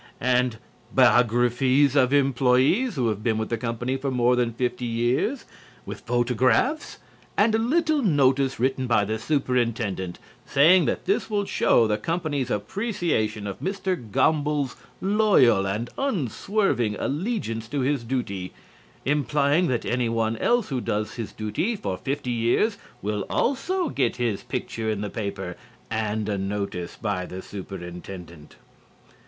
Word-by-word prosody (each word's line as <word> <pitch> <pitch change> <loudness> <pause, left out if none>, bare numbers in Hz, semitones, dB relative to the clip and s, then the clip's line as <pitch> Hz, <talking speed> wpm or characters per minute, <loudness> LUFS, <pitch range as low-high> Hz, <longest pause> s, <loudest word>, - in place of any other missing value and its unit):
And 125 -2 +1 0.4
biographies 125 +4 +4
of 130 -2 +4
employees 140 - +3
who 125 -4 +1
have 105 -1 -3
been 110 0 0
with 110 0 -2
the 115 - -1
company 120 +3 -2
for 135 +1 -3
more 125 -1 +3
than 120 -1 +1
fifty 125 +1 -2
years, 120 - 0 0.4
with - - -6
photographs, 125 - +1 0.4
and 215 +2 +4
a 220 - +3
little 310 +5 +2
notice 135 - +2
written 130 +1 0
by 105 -4 +3
the 110 +2 -2
Superintendent 115 - -1 0.3
saying 165 +6 +5
that - - -2
this 395 - 0
will 205 -2 0
show 120 - +3
the 105 -1 0
company's 150 -3 -2
appreciation 120 - -1
of 100 - -5
Mr. 190 0 -1
Gomble's 145 +2 +1 0.3
loyal 190 - +4
and 105 +5 -2
unswerving 195 - 0
allegiance 145 - -2
to 145 +1 -2
his 135 -1 0
duty, 100 -7 -3 0.5
implying 145 +3 +2
that 120 -2 -1
any 120 -1 0
one 115 -1 0
else 240 - +1
who 130 -3 -2
does 105 -1 -2
his 115 -3 -5
duty 110 - -2
for 100 - -3
fifty 135 +4 -3
years 120 - +1 0.2
will 105 -1 -1
also 345 +7 0
get - - 0
his 115 -5 -1
picture 110 -1 -4
in 105 -2 -1
the 105 - -4
paper 100 -5 -4 0.4
and 110 -1 -1
a 100 -2 -1
notice 95 -3 -4
by 95 -5 -2
the 95 +1 -7
Superintendent. 90 -4 -9
125 Hz, 140 wpm, -25 LUFS, 110-150 Hz, 0.5 s, saying